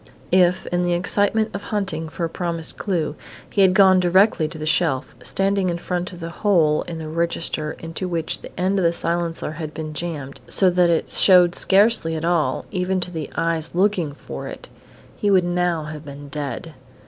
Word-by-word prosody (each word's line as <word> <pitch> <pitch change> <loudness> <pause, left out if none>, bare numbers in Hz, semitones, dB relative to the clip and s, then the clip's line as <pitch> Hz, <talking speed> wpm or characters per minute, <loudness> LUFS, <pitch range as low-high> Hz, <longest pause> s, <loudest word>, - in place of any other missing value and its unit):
If, 180 0 +3
in 175 0 +1
the 175 0 +1
excitement 205 +5 +1
of 200 - -4
hunting 185 -7 -3
for 170 - -3
a - - -1
promised 170 -2 -3
clue, 175 -7 -2 0.3
he 200 - 0
had 190 -1 +5
gone 190 -2 +6
directly 180 -2 +3
to 160 - -8
the 155 - -5
shelf, 155 -5 0
standing 195 -1 +1
in 170 - -2
front 180 +1 -3
of 175 - -11
the 165 0 -6
hole 165 -8 +3
in 170 -2 -5
the 160 -1 -6
register 165 -1 -2
into 165 +3 -5
which 165 -3 -1
the - - -9
end 190 +2 +1
of - - 0
the 170 0 +3
silencer 170 -2 -2
had 155 -1 -7
been 155 -1 -5
jammed, 150 -4 -5
so 185 -2 +4
that 175 -1 +3
it 165 -1 +1
showed 180 -2 +6
scarcely 195 -5 +3
at 160 +1 -3
all, 165 -7 0
even 185 0 -1
to 170 -4 -4
eyes 165 0 -1
looking 180 -5 +1
for - - -8
it, - - -9 0.5
he 205 - 0
would 185 -3 +4
now 175 -2 0
have 155 0 -8
been 140 0 -10
dead. 145 +2 -5
175 Hz, 195 wpm, -21 LUFS, 160-185 Hz, 0.5 s, gone